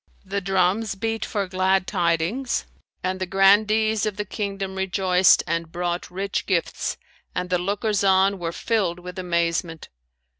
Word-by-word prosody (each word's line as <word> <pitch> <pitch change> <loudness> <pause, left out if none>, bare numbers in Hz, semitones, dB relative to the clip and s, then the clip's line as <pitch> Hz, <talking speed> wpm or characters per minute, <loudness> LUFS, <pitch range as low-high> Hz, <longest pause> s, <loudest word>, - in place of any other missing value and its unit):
The 200 +1 -2
drums 195 +3 +1
beat 225 +3 -2
for 205 -2 -2
glad 185 0 +1
tidings 180 +8 0 0.4
and 185 +1 -2
the 185 - -1
Grandees 215 +3 +3
of 205 -2 -4
the 210 - -2
kingdom 195 -1 -4
rejoiced 190 -1 +3
and 165 -1 -2
brought 175 0 -3
rich 195 +2 -3
gifts 180 -4 -1 0.4
and 180 0 -3
the 180 - +2
lookers 205 +2 0
on 195 0 +3
were 165 -1 -3
filled 195 -3 -1
with 180 +1 -8
amazement. 170 -2 -1
190 Hz, 145 wpm, -23 LUFS, 180-200 Hz, 0.4 s, Grandees